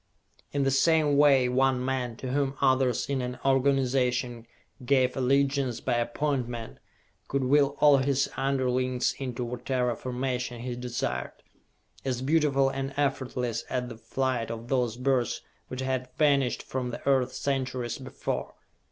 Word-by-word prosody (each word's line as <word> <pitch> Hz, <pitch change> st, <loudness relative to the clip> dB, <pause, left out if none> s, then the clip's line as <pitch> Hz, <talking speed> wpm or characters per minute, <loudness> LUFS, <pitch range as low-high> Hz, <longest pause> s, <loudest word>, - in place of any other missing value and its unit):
In 140 Hz, -1 st, 0 dB
the 135 Hz, -, +2 dB
same 150 Hz, +1 st, +3 dB
way, 140 Hz, -3 st, +5 dB
one 130 Hz, 0 st, +2 dB
man, 130 Hz, -3 st, -2 dB
to 125 Hz, +1 st, -5 dB
whom 140 Hz, 0 st, 0 dB
others 130 Hz, -2 st, +2 dB
in 135 Hz, -2 st, -1 dB
an 125 Hz, 0 st, -4 dB
organization 130 Hz, -3 st, +1 dB, 0.4 s
gave 130 Hz, 0 st, +2 dB
allegiance 135 Hz, -1 st, +1 dB
by 130 Hz, -, -1 dB
appointment, 120 Hz, -, -2 dB, 0.5 s
could 140 Hz, -1 st, 0 dB
will 140 Hz, +2 st, +3 dB
all 145 Hz, -2 st, +7 dB
his 135 Hz, 0 st, +1 dB
underlings 130 Hz, -2 st, 0 dB
into 125 Hz, -2 st, -3 dB
whatever 125 Hz, 0 st, -1 dB
formation 125 Hz, -1 st, -3 dB
he 125 Hz, 0 st, -4 dB
desired. 125 Hz, 0 st, -4 dB, 0.6 s
As 130 Hz, -1 st, -2 dB
beautiful 140 Hz, -2 st, +3 dB
and 135 Hz, 0 st, -4 dB
effortless 125 Hz, -4 st, -1 dB
at 125 Hz, -1 st, -2 dB
the 120 Hz, -, -7 dB
flight 125 Hz, 0 st, -2 dB
of 115 Hz, +1 st, -6 dB
those 125 Hz, -4 st, 0 dB
birds 125 Hz, -2 st, 0 dB, 0.2 s
which 130 Hz, 0 st, -5 dB
had 130 Hz, -1 st, -2 dB
vanished 140 Hz, -4 st, +2 dB
from 130 Hz, -1 st, -3 dB
the 120 Hz, -, -7 dB
earth 135 Hz, -2 st, +3 dB
centuries 130 Hz, -3 st, -2 dB
before. -, -, -4 dB
130 Hz, 140 wpm, -28 LUFS, 125-135 Hz, 0.6 s, all